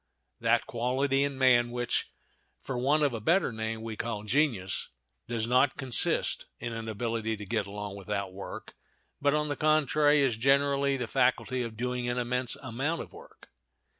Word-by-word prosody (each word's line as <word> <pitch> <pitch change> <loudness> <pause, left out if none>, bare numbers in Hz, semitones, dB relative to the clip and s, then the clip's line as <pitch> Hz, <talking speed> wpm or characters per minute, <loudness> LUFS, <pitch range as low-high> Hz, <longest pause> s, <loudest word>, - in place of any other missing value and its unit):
That - - +2
quality 130 +4 0
in 140 -1 -2
man 125 -2 +4
which, 120 0 -2 0.5
for 135 - -5
want 140 +5 +2
of 140 -4 +2
a 115 - -4
better 170 - +2
name, 110 0 -4
we 115 -1 -5
call 110 -2 -4
genius, 110 - 0 0.4
does 115 -2 -1
not 130 +3 +3
consist 130 -4 +2
in 115 - -4
an 115 0 -5
ability 110 0 -2
to 105 - -8
get 105 -1 -1
along 100 0 -6
without 100 -1 -4
work, 95 +1 -8 0.5
but, 145 +1 +3
on 150 0 0
the 145 - -2
contrary, 150 0 +3
is 125 -5 +1
generally 140 +2 +2
the 125 - -2
faculty 130 +1 +1
of 115 -2 -5
doing 125 0 -2
an 120 - -1
immense 125 0 0
amount 135 +7 -2
of - - -16
work. - - -15
125 Hz, 170 wpm, -29 LUFS, 110-140 Hz, 0.5 s, man